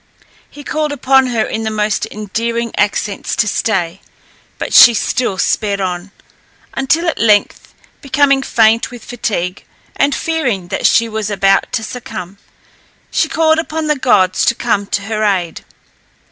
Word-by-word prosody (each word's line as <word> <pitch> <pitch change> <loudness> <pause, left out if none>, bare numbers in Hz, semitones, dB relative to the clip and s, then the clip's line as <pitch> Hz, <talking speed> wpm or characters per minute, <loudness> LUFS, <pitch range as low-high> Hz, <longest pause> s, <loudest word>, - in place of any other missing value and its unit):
He 290 - -12
called 305 +1 -2
upon 265 -1 +3
her 235 -3 0
in 220 - -4
the 220 - -2
most 210 -1 -1
endearing 230 +3 -3
accents 205 -1 -1
to 210 - +1
stay, 190 -4 -1 0.6
but - - -5
she 235 - +9
still 230 -3 -1
sped 200 +1 0
on, 180 0 -3 0.6
until 320 +6 0
at 325 - -1
length, 210 -2 +1 0.3
becoming 275 0 +2
faint 225 -3 +2
with 245 -2 -11
fatigue, 195 -7 -3 0.3
and 285 - +1
fearing 245 - -2
that 190 - +1
she 230 - +3
was 220 -1 -3
about 195 -1 +2
to 225 - -1
succumb, 215 -5 -8 0.7
she 320 - +1
called 320 0 +2
upon 320 -1 -3
the 300 0 +1
gods 205 -9 +2
to 235 - +2
come 205 -5 -1
to 200 - -2
her 215 +1 -2
aid. 185 -5 -1
220 Hz, 150 wpm, -15 LUFS, 200-265 Hz, 0.7 s, she